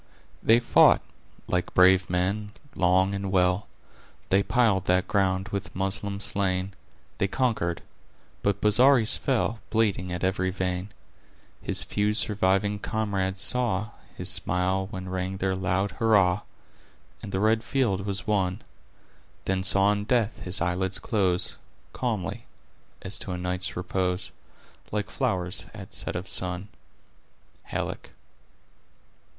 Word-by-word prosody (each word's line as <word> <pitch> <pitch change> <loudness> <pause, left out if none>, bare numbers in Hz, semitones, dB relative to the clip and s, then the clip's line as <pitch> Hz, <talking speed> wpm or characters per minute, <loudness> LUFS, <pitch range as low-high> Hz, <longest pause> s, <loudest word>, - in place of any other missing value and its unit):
"They 115 +1 +5
fought, 120 - +5 0.4
like 90 0 -2
brave 95 +1 +5
men, 100 +4 -1 0.2
long 95 +2 +2
and 100 -1 -3
well, 90 +1 +2 0.6
They 95 +1 +4
piled 105 -4 +2
that 90 0 +2
ground 95 0 +1
with 100 -2 -5
Moslem 100 +1 -2
slain, 95 -1 -1 0.5
They 100 - +2
conquered—but 100 -2 -3
Bozzaris 115 +2 +5
fell, 115 -4 0
Bleeding 100 -5 +1
at 90 +1 -4
every 95 0 +1
vein. 90 0 -3 0.7
His - - +2
few 105 +1 0
surviving 105 -1 +2
comrades 100 -3 -2
saw 110 -5 +1 0.3
His - - -5
smile 95 +1 0
when 95 -3 -6
rang 95 +1 -3
their 95 0 0
loud 95 +1 0
hurrah, 100 -3 +3 0.8
And - - -7
the 95 - -1
red 110 +2 +2
field 115 -7 0
was 100 -1 -3
won; 100 -2 0 0.8
Then 95 0 0
saw 100 +1 +5
in 105 0 -2
death 115 -1 +1
his 90 -1 0
eyelids 90 +2 0
close 95 -6 0 0.4
Calmly, 115 -7 -3 0.6
as 95 - -2
to 95 - -5
a - - -3
night's 90 0 -3
repose, 90 0 -1 0.6
Like 105 +1 -2
flowers 95 -10 -1
at - - -10
set - - -3
of 90 +2 -4
sun." 90 +2 -1 1.0
—Halleck. - - -4
95 Hz, 125 wpm, -26 LUFS, 95-105 Hz, 1.0 s, They